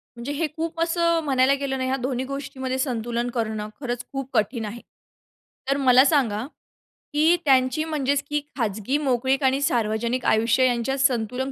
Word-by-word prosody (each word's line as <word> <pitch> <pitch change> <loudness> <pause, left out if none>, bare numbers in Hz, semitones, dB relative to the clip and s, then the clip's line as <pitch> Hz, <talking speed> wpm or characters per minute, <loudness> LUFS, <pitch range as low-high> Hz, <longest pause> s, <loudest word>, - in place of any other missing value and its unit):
म्हणजे 240 +4 -5
हे 315 +2 -1
खूप 330 0 -3
असं 335 0 +2
म्हणायला 265 -1 +3
गेलं 275 -1 -2
नाही 260 0 -2
ह्या 265 - 0
दोन्ही 255 0 -2
गोष्टींमध्ये 265 -1 -4
संतुलन 240 -2 -2
करणं, 220 -3 -3
खरंच 245 -3 -4
खूप 270 -1 -4
कठीण 220 +1 0
आहे. 230 +3 -7 0.9
तर 275 - +2
मला 260 -1 +6
सांगा, 245 -8 +1 0.7
की 315 +4 +4
त्यांची 260 +2 +3
म्हणजेच 285 -3 0
की 295 0 0 0.2
खाजगी 220 +3 -1
मोकळीक 265 -1 0
आणि 265 +1 +2
सार्वजनिक 235 -1 0
आयुष्य 230 +4 +3
यांच्यात 245 +3 -1
संतुलन 255 0 0
260 Hz, 155 wpm, -24 LUFS, 235-280 Hz, 0.9 s, मला